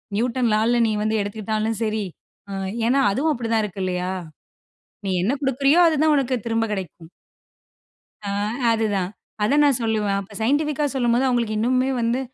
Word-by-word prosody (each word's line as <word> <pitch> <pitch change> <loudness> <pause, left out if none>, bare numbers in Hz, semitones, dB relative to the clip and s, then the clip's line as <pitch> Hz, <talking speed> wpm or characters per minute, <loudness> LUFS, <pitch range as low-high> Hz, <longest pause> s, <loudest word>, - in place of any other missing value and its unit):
Newton 235 0 +1
லால்ல 225 +3 +2
நீ - - 0
வந்து 220 +1 0
எடுத்துக்கிட்டாலும் 215 +2 -2
சரி. 215 -1 -1 0.8
ஏன்னா 270 +3 +3
அதுவும் 295 +9 +1
அப்டிதான் 230 -3 0
இருக்கு 195 -1 -7
இல்லயா? 180 0 -2 0.9
நீ 195 - -1
என்ன 230 - +1
குடுக்குறியோ 275 +4 +3
அதுதான் 310 -1 +3
உனக்கு 265 -2 +1
திரும்ப 225 0 0
கெடைக்கும்" 175 -4 -6
ம். - - -27 1.2
ஆ - - -2 0.4
அதுதான். 205 -5 0 0.3
அத 275 +8 +2
நான் 280 -4 +3
சொல்லுவேன். 210 -3 0
அப்போ 200 +2 -13
சைன்டிஃபிக்கா 290 +4 +1
சொல்லும்போது 245 +1 +2
அவங்களுக்கு 235 -4 0
இன்னுமே 255 +3 +2
வந்து 235 +2 +1
230 Hz, 145 wpm, -22 LUFS, 215-260 Hz, 1.2 s, ஏன்னா